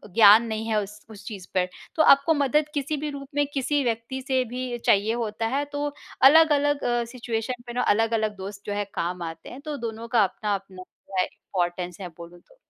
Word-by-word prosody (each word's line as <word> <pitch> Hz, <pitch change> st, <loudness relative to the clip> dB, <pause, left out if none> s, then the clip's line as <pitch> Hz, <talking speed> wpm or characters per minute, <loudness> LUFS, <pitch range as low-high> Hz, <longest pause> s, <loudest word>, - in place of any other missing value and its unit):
ज्ञान 220 Hz, 0 st, +8 dB
नहीं 220 Hz, 0 st, -3 dB
है 215 Hz, -1 st, +2 dB
उस 210 Hz, +1 st, -8 dB
उस 210 Hz, -2 st, -12 dB
चीज़ 195 Hz, -5 st, -8 dB
पर 180 Hz, -1 st, +2 dB, 0.3 s
तो 315 Hz, -, +4 dB
आपको 280 Hz, +2 st, +6 dB
मदद 290 Hz, +1 st, +2 dB
किसी 295 Hz, +1 st, -2 dB
भी 300 Hz, +1 st, -3 dB
रूप 280 Hz, -1 st, -7 dB
में, 290 Hz, 0 st, +3 dB
किसी 285 Hz, +1 st, 0 dB
व्यक्ति 235 Hz, +2 st, -2 dB
से 260 Hz, -2 st, +2 dB
भी 250 Hz, +1 st, -4 dB
चाहिए 210 Hz, +2 st, +3 dB
होता 225 Hz, -1 st, -2 dB
है 285 Hz, -, +1 dB
तो 290 Hz, 0 st, -2 dB, 0.4 s
अलग-अलग 290 Hz, 0 st, +5 dB
अ, 240 Hz, -1 st, +1 dB
सिचुएशन 240 Hz, 0 st, -4 dB
पे 240 Hz, -, -6 dB
ना 250 Hz, -, 0 dB
अलग-अलग 220 Hz, -1 st, +1 dB
दोस्त 200 Hz, +1 st, -7 dB
जो 205 Hz, -, -3 dB
है, 205 Hz, 0 st, -1 dB
काम 175 Hz, +1 st, -3 dB
आते 165 Hz, 0 st, -7 dB
हैं 260 Hz, -, -10 dB
तो 300 Hz, -1 st, -5 dB
दोनों 230 Hz, -1 st, -5 dB
का 230 Hz, -2 st, +4 dB
अपना-अपना 195 Hz, -1 st, -3 dB
जो 190 Hz, +1 st, -11 dB
है 185 Hz, -, +3 dB
इम्पोर्टेंस 175 Hz, 0 st, -4 dB
है, 185 Hz, -, -4 dB
बोलूँ 170 Hz, +1 st, -11 dB
तो। -, -, -25 dB
230 Hz, 210 wpm, -25 LUFS, 200-275 Hz, 0.4 s, ज्ञान